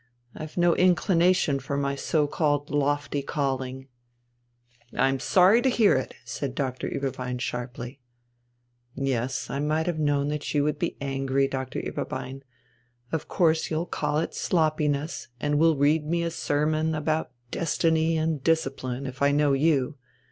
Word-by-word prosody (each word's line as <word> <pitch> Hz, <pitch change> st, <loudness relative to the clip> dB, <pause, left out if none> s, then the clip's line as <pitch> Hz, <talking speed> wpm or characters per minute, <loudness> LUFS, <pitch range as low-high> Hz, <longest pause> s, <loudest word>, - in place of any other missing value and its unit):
I've 155 Hz, +2 st, -8 dB
no 175 Hz, -1 st, +4 dB
inclination 180 Hz, -4 st, +3 dB
for 140 Hz, +2 st, -3 dB
my 140 Hz, 0 st, 0 dB
so 150 Hz, +2 st, +1 dB
called 145 Hz, -1 st, 0 dB
lofty 145 Hz, 0 st, 0 dB
calling." 135 Hz, -2 st, -3 dB, 1.1 s
"I'm 135 Hz, 0 st, +2 dB
sorry 190 Hz, -, +5 dB
to 265 Hz, -, +3 dB
hear 220 Hz, -, +4 dB
it!" 130 Hz, -, -2 dB
said 130 Hz, +1 st, -4 dB
Doctor 130 Hz, -2 st, -2 dB
Ueberbein 125 Hz, -2 st, -3 dB
sharply. 125 Hz, +1 st, -5 dB, 1.0 s
"Yes, 130 Hz, -2 st, -1 dB
I 140 Hz, -, -2 dB
might 155 Hz, +2 st, 0 dB
have 175 Hz, -3 st, -2 dB
known 145 Hz, -1 st, +1 dB
that 150 Hz, 0 st, -3 dB
you 145 Hz, -, +3 dB
would 150 Hz, 0 st, -1 dB
be -, -, -2 dB
angry, 135 Hz, 0 st, 0 dB
Doctor 130 Hz, -1 st, -4 dB
Ueberbein. 135 Hz, +1 st, -5 dB, 0.7 s
Of 160 Hz, -, -2 dB
course 160 Hz, -4 st, +2 dB
you'll 160 Hz, +2 st, -1 dB
call 150 Hz, -3 st, -1 dB
it 160 Hz, -, -1 dB
sloppiness, 155 Hz, -2 st, 0 dB
and 145 Hz, +2 st, +1 dB
will 160 Hz, -1 st, +4 dB
read 150 Hz, +3 st, +3 dB
me 170 Hz, +1 st, 0 dB
a 170 Hz, -, -1 dB
sermon 155 Hz, +1 st, 0 dB
about 155 Hz, +1 st, -1 dB, 0.2 s
'destiny 165 Hz, 0 st, +1 dB
and 155 Hz, -3 st, -1 dB
discipline,' 135 Hz, -5 st, -1 dB
if 130 Hz, 0 st, -7 dB
I 140 Hz, 0 st, +4 dB
know 145 Hz, -1 st, +3 dB
you. 140 Hz, -1 st, +1 dB
145 Hz, 150 wpm, -26 LUFS, 135-160 Hz, 1.1 s, sorry